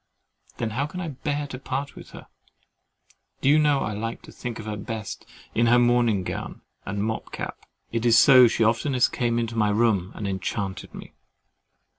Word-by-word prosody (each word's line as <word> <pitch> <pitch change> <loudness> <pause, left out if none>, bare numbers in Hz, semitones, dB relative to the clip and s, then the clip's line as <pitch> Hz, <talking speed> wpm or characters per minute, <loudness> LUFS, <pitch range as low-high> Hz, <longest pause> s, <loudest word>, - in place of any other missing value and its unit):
Then 115 -2 -2
how 135 +6 -1
can 180 +4 -7
I 175 -3 -3
bear 145 +1 -3
to 130 -3 -7
part 135 +1 -4
with - - -11
her? - - -11 1.2
Do - - 0
you 150 +2 +6
know 145 -2 +3
I 105 - -2
like 115 +3 -5
to - - -12
think 120 -2 -6
of 110 - -8
her 105 -1 -3
best 105 +1 -6 0.3
in 115 +1 +2
her 120 +1 +6
morning 120 -5 +3
gown - - -5 0.3
and 100 +1 -2
mob 110 +1 -3
cap—it 115 0 -6
is 115 -2 +5
so 125 +1 +8
she 115 - +1
has 110 - +6
oftenest 130 -1 +1
come 120 -2 0
into 115 -1 -2
my 105 -2 +2
room 105 -4 +1
and 105 - -4
enchanted 95 0 -4
me! - - -10
115 Hz, 190 wpm, -25 LUFS, 105-130 Hz, 1.2 s, so